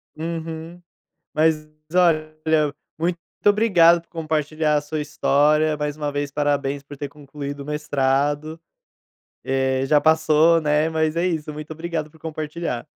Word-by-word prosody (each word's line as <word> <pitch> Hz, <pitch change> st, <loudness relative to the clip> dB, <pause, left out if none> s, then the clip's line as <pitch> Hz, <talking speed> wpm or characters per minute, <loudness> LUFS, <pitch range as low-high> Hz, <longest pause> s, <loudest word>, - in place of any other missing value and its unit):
Uhum. 165 Hz, +1 st, -6 dB, 0.5 s
Mas 155 Hz, -1 st, +2 dB, 0.3 s
olha, 155 Hz, -4 st, +3 dB, 0.6 s
muito 170 Hz, +2 st, 0 dB, 0.3 s
obrigado 185 Hz, -6 st, +5 dB
por -, -, -37 dB
compartilhar 155 Hz, -1 st, -1 dB
a -, -, +2 dB
sua 150 Hz, +1 st, -4 dB
história, 150 Hz, +1 st, +2 dB
mais 150 Hz, 0 st, -3 dB
uma 150 Hz, -1 st, -2 dB
vez 145 Hz, 0 st, -2 dB
parabéns 145 Hz, -1 st, -1 dB
por 145 Hz, +1 st, -11 dB
ter 145 Hz, +1 st, -5 dB
concluído 145 Hz, 0 st, -8 dB
o -, -, -6 dB
mestrado. 145 Hz, +1 st, 0 dB, 0.8 s
Eh, 130 Hz, 0 st, 0 dB
já 150 Hz, +2 st, +4 dB
passou, 160 Hz, +1 st, +4 dB
né, 150 Hz, +1 st, +2 dB
mas 160 Hz, -1 st, 0 dB
é 170 Hz, +1 st, +1 dB
isso, 160 Hz, -4 st, -2 dB
muito 150 Hz, +1 st, -8 dB
obrigado 160 Hz, -1 st, -4 dB
por 160 Hz, -, -20 dB
compartilhar. 155 Hz, -4 st, -4 dB
155 Hz, 140 wpm, -22 LUFS, 145-160 Hz, 0.8 s, obrigado